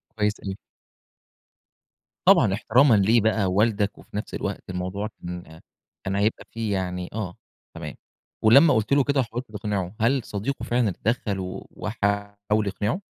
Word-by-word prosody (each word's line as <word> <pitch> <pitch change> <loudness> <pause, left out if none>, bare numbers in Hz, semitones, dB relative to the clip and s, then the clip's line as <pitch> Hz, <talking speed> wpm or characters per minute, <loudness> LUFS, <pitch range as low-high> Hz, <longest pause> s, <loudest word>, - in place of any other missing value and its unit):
كويس 105 -1 0
أوي. 95 -1 -5 1.7
طبعا 95 - +6
احترامًا 120 +4 +4
ليه 110 +4 +4
بقى 110 -1 +2
والدك، 105 +2 +1
وفي 105 - -9
نفس 105 - -5
الوقت - - -4
الموضوع 90 +3 -3 0.2
كان 85 -2 -8 0.4
كان 95 0 -2
هيبقى 105 +2 0
فيه 110 -3 -2
يعني 90 -1 -2
آه، 100 -5 -4 0.4
تمام - - -6 0.5
ولما 140 +8 +7
قُلت 110 +5 +1
له 140 -1 +5
كده 140 0 +1
وحاولت 120 -1 -3
تقنعه، 100 -2 -3
هل 130 +4 +3
صديقه 105 +7 -4
فعلاً 120 -2 +1
اتدخل 105 +1 -1
و 90 -1 -6
وحاول 100 0 -1
يقنعه؟ 105 - -1
105 Hz, 140 wpm, -25 LUFS, 95-115 Hz, 1.7 s, ولما